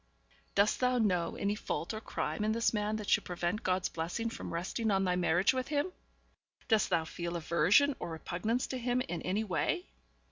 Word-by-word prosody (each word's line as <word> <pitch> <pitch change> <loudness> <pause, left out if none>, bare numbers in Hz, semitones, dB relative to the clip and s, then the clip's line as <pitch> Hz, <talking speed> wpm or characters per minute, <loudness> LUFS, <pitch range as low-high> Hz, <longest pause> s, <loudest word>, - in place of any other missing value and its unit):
'Dost 200 +1 +3
thou 250 0 +2
know 180 -7 +1
any 200 +1 0
fault 210 -2 -3
or 215 - -5
crime 215 - -2
in 215 +1 +2
this 230 0 +2
man 210 0 0
that 210 -2 -5
should - - +3
prevent 175 +4 -2
God's 185 -2 +1
blessing 180 +8 -3
from - - -6
resting 185 +7 -1
on 195 -1 +2
thy 180 -1 +1
marriage 180 +3 +3
with 255 0 -2
him? 295 +5 0 0.8
Dost 220 -3 +3
thou 165 -3 +2
feel 170 +1 -4
aversion 170 - +4
or 175 - -4
repugnance 180 +9 -2
to 260 - -4
him 245 +1 +1
in 175 -10 -4
any 205 +4 0
way?' 220 - -1
205 Hz, 190 wpm, -32 LUFS, 175-230 Hz, 0.8 s, aversion